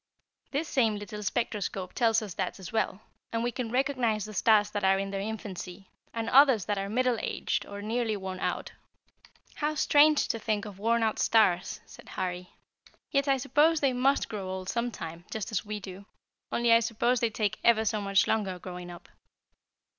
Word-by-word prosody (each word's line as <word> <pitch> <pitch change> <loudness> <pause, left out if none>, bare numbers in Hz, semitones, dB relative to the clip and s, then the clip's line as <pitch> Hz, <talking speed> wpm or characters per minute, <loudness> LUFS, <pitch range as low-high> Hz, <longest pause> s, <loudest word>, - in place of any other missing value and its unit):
"This 295 +3 -2
same 225 -5 +2
little 205 0 -7
spectroscope 200 -4 -2
tells 225 -2 +2
us 200 -4 -6
that - - -3
as 190 -3 -9
well, 220 -2 -1 0.3
and 230 0 -1
we 240 - 0
can 240 -2 -4
recognize 245 -4 0
the 215 - -9
stars 210 +1 +4
that 205 -1 -3
are 190 0 +4
in 195 0 -3
their 195 -1 -3
infancy, 195 -3 -7 0.2
and 230 -1 -3
others 260 -6 +6
that 205 -1 -1
are 195 0 -3
middle 250 +1 +1
aged - - -2
or 200 0 -7
nearly 225 0 -1
worn 190 -1 -6
out." - - -2 0.9
"How 305 +1 -1
strange 300 0 +4
to 230 - -1
think 215 -1 -1
of 200 -2 -9
worn 230 +2 +2
out 220 -1 0
stars," 190 -6 +2
said - - -14
Harry; 180 -1 -4 0.6
"yet 280 0 +1
I 270 -1 +3
suppose 300 +5 +3
they 275 -3 +2
must 265 +3 +2
grow 195 -3 -5
old 185 0 -5
sometime, 180 -9 -4
just 220 -1 -4
as 210 - -1
we 210 0 -5
do; 195 0 -10 0.4
only 235 -1 +3
I 230 - +7
suppose 235 +2 +1
they 235 - +1
take 215 -1 -2
ever 220 -2 +4
so 215 0 0
much 195 -1 +3
longer 195 -4 0
growing 180 0 -8
up." 175 0 -11
215 Hz, 190 wpm, -29 LUFS, 195-240 Hz, 0.9 s, I